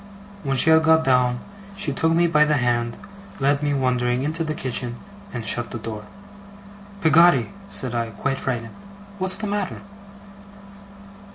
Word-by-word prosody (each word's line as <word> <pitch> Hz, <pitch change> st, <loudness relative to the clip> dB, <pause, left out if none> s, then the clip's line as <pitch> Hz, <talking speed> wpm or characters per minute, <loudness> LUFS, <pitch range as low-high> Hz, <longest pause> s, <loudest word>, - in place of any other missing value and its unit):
When 135 Hz, -2 st, -1 dB
she 160 Hz, +5 st, +5 dB
had 160 Hz, 0 st, +6 dB
got 160 Hz, 0 st, +4 dB
down, 125 Hz, -2 st, +2 dB, 0.4 s
she 145 Hz, -7 st, -1 dB
took 160 Hz, +4 st, +1 dB
me 170 Hz, +1 st, +3 dB
by 155 Hz, -3 st, +4 dB
the 150 Hz, 0 st, +2 dB
hand; 120 Hz, -2 st, 0 dB, 0.4 s
led 140 Hz, +1 st, +2 dB
me, 145 Hz, 0 st, 0 dB
wondering, 125 Hz, -1 st, 0 dB
into 160 Hz, +3 st, -1 dB
the 155 Hz, -1 st, -3 dB
kitchen; 125 Hz, -3 st, -2 dB, 0.4 s
and 120 Hz, -3 st, -5 dB
shut 120 Hz, +3 st, 0 dB
the 120 Hz, -, -5 dB
door. 110 Hz, -2 st, -7 dB, 1.0 s
'Peggotty!' 160 Hz, -5 st, +5 dB, 0.2 s
said 130 Hz, -9 st, -1 dB
I, 115 Hz, -1 st, -1 dB
quite 135 Hz, +6 st, -3 dB
frightened. 115 Hz, -3 st, -4 dB, 0.5 s
'What's 190 Hz, 0 st, +2 dB
the 220 Hz, -, -4 dB
matter? 205 Hz, -2 st, -3 dB
135 Hz, 155 wpm, -22 LUFS, 120-160 Hz, 1.0 s, had